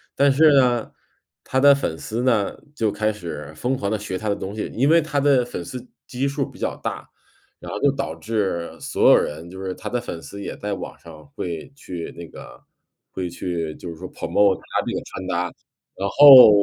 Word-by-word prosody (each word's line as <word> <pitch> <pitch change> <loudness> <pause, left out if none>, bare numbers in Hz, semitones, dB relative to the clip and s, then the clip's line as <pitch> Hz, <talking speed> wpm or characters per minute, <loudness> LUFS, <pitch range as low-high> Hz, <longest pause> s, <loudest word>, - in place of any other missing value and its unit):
但 140 0 +4
是 155 +3 +6
呢， 125 -4 +3 0.5
他 130 - 0
的 140 +1 +7
粉 85 -13 -3
丝 115 +8 -4
呢， 115 -6 +1 0.2
就 110 -6 0
开 105 +1 0
始 85 -5 -7
疯 125 +11 -1
狂 100 -5 -3
地 110 - +1
学 100 -3 -4
他 110 +2 -3
的 100 - +1
东 100 +1 -6
西， 110 - -4
因 135 +5 +2
为 165 +1 +6
他 150 -2 -1
的 135 -3 +3
粉 120 -7 -6
丝 125 +7 -8 0.2
基 130 +2 -2
数 140 0 -1
比 - - -16
较 - - -2
大。 - - -5 0.5
然 - - -8
后 - - -4
就 140 - +3
导 140 - -4
致 100 -6 -2
所 - - +3
有 - - +9
人， 80 +3 -1
就 95 +2 -9
是 95 - -3
他 - - -8
的 125 0 -1
粉 85 - -6
丝 100 - -9
也 - - -6
在 105 0 -3
网 95 - -7
上 80 -2 -13
会 85 - -5
去 90 - -7
那 85 0 -8
个， - - -12 0.5
会 90 -2 -4
去， 85 -3 -4
就 - - -10
是 85 - -6
说 - - -8
promote 100 -2 +2
他 - - -3
这 - - -3
个 - - -2
穿 95 - -7
搭。 90 -1 0 0.5
然 100 +1 -2
后 135 +1 +10
105 Hz, 255 characters per minute, -22 LUFS, 90-130 Hz, 0.5 s, 后